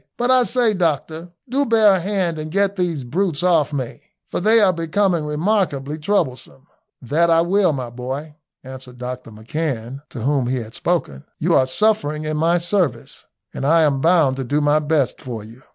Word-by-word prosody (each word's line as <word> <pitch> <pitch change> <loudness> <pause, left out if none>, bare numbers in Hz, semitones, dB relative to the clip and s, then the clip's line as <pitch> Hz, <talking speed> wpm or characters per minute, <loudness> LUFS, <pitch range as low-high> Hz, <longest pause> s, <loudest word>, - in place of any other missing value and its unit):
"But 245 +1 +1
I 255 -1 +5
say, 245 -2 +2
doctor, 165 -1 -2 0.2
do 270 +3 +1
bear 220 -5 +4
a 190 - +1
hand 180 -3 -1
and 155 0 -5
get 200 +2 +1
these 175 -7 -2
brutes 165 +4 -1
off 165 -5 +3
me, 130 -4 -5 0.3
for - - -1
they 220 +5 +4
are 195 -4 +4
becoming 165 0 0
remarkably 150 -3 -1
troublesome." 140 -6 -2 0.4
"That 160 +7 +1
I 165 0 +5
will, 185 +1 +2
my 130 -4 -5
boy," 130 +5 -6 0.3
answered 130 -1 -11
Dr 125 -1 -6
McCan, 120 +2 -4
to 120 - -8
whom 135 0 0
he 130 +1 -1
had 115 -2 -7
spoken. 160 - -2
"You - - 0
are 130 - +4
suffering 155 -2 +1
in 155 0 -2
my 165 +3 +2
service, 175 - -2 0.3
and - - -5
I 160 +3 +4
am 140 -3 +1
bound 160 -5 +3
to 135 - -3
do 145 +4 0
my 145 +1 +3
best 150 -3 0
for 115 -5 -6
you." 115 +4 -14
155 Hz, 185 wpm, -20 LUFS, 130-180 Hz, 0.4 s, I